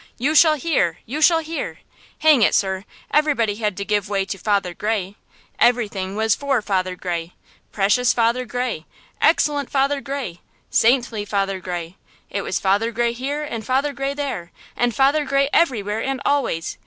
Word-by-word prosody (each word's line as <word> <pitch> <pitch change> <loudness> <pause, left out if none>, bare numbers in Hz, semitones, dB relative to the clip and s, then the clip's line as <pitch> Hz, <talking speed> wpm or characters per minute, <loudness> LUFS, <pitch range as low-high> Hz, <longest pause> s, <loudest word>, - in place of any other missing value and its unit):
You 275 +6 0
shall 315 0 +6
hear! 265 - 0
You 290 +7 -4
shall 325 +1 +5
hear! 330 +10 -5 0.4
Hang 310 -5 +5
it, - - +4
sir, 190 0 0 0.3
everybody 260 -9 +2
had 210 -4 -2
to 200 - -3
give 205 -1 0
way 195 -1 0
to 195 0 -5
Father 200 -3 0
Gray! 205 0 -2 0.5
Everything 205 -6 +1
was 220 0 +2
for 280 -3 0
Father 185 -3 -1
Gray! 175 -2 -4 0.4
Precious 210 +5 +2
Father 235 +2 +1
Gray! 245 -9 -3 0.3
Excellent 295 -4 +2
Father 275 +1 +1
Gray! 270 -11 -5 0.3
Saintly 235 -3 +2
Father 195 -2 -1
Gray! 175 0 -6 0.3
It 200 - -2
was 185 - -2
Father 205 +4 +1
Gray 235 0 0
here 280 +5 -3
and 235 -7 -5
Father 270 +4 0
Gray 275 0 -3
there, 270 -12 -4 0.2
and 240 -1 0
Father 280 +3 +3
Gray 275 0 +1
everywhere 220 -8 +1
and 270 -1 -2
always! 255 - 0
230 Hz, 165 wpm, -21 LUFS, 195-275 Hz, 0.5 s, shall